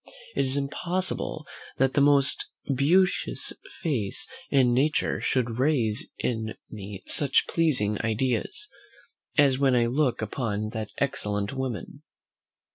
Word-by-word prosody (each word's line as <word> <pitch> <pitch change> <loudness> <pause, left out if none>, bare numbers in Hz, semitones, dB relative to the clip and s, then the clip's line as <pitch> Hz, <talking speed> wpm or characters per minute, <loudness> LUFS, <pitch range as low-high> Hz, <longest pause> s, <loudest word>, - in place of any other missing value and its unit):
It - - +2
is 130 +2 +3
impossible, 160 +2 -2 0.3
that 135 0 +2
the 145 - +3
most 140 -1 +3 0.3
beauteous 180 +8 +2 0.3
face 120 - -1 0.2
in 130 -3 +4
nature 145 +5 +1
should 120 -2 0
raise 125 -7 +1
in 110 -2 -2 0.2
me 100 -2 -8
such 140 -3 +2
pleasing 125 - +2
ideas, 120 - -1 0.7
as 140 -3 +5
when 135 -2 +4
I 120 -1 +4
look 125 -1 +1
upon 105 -1 -2
that 110 -1 -4
excellent 105 -6 -1
woman. 130 +1 -4
130 Hz, 120 wpm, -27 LUFS, 110-140 Hz, 0.7 s, as